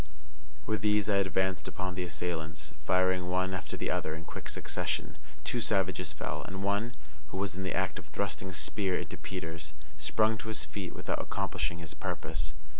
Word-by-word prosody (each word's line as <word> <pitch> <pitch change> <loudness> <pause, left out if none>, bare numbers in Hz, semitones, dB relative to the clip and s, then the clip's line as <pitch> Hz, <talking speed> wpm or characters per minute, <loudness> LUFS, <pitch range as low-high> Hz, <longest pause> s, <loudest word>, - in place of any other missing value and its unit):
With 110 - +1
these 105 -1 +4
I 100 - +6
advanced 95 -1 +2
upon 95 -1 -2
the 90 - -1
assailants, 80 -3 -2
firing 95 -1 +4
one 95 +1 +2
after 85 -5 -3
the - - +1
other 80 - +1
in 80 +1 -7
quick - - -5
succession. - - -1 0.2
Two 85 +10 +1
savages 95 -6 +2
fell, 75 - -2
and 95 +1 -4
one, 100 +4 +2 0.3
who 85 - -5
was 95 -3 +1
in 95 - -3
the 95 -2 0
act 95 0 +1
of - - -11
thrusting 95 -2 -1
a - - -6
spear 95 +1 +2
into - - -3
Peters, 80 -4 -4 0.3
sprung 110 +8 +4
to - - -6
his 105 -9 0
feet 90 +4 -4
without - - 0
accomplishing 85 - 0
his 80 -2 -5
purpose. 75 0 -1
95 Hz, 185 wpm, -33 LUFS, 85-100 Hz, 0.3 s, I